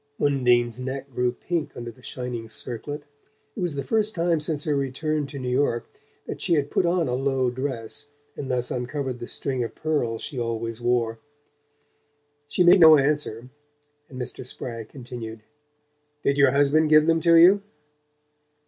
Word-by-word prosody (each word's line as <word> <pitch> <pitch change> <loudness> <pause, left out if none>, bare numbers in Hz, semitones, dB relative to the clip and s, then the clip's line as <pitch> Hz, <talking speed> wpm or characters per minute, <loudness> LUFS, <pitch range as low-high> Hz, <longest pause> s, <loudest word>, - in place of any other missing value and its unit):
Undine's 125 -4 +2
neck 135 +2 -5
grew 125 +1 +1
pink 165 +5 -4
under 120 0 -6
the - - -21
shining 125 -3 -5
circlet. 130 +6 -5 0.5
It - - -7
was 175 -5 -1
the 140 - -3
first 215 -1 +1
time 170 -1 +1
since 150 -1 -1
her 150 -2 0
return 140 +2 -1
to 140 - -8
New 125 -2 -3
York 125 -3 0 0.4
that - - -6
she 170 - +2
had 145 -2 -1
put 175 - +2
on 170 -1 +1
a 125 - -1
low 130 -1 +1
dress 130 +1 -4 0.3
and 135 - -6
thus 125 -1 -1
uncovered 125 0 -3
the 120 - -6
string 130 -3 -2
of 115 - -6
pearls 135 -8 -1
she 135 -5 -5
always 115 0 -3
wore. 120 -2 0 1.3
She 165 +5 +2
made 175 +2 +7
no 160 -2 +9
answer, 135 -4 -1 0.6
and 130 - -9
Mr. 125 - -4
Spragg 115 -3 -7
continued: 120 -4 -8 0.8
"Did 140 - +2
your 140 -1 +5
husband 145 +3 +3
give 155 0 +6
them 165 0 +3
to 170 0 +4
you?" 180 +5 +7
135 Hz, 165 wpm, -25 LUFS, 120-150 Hz, 1.3 s, no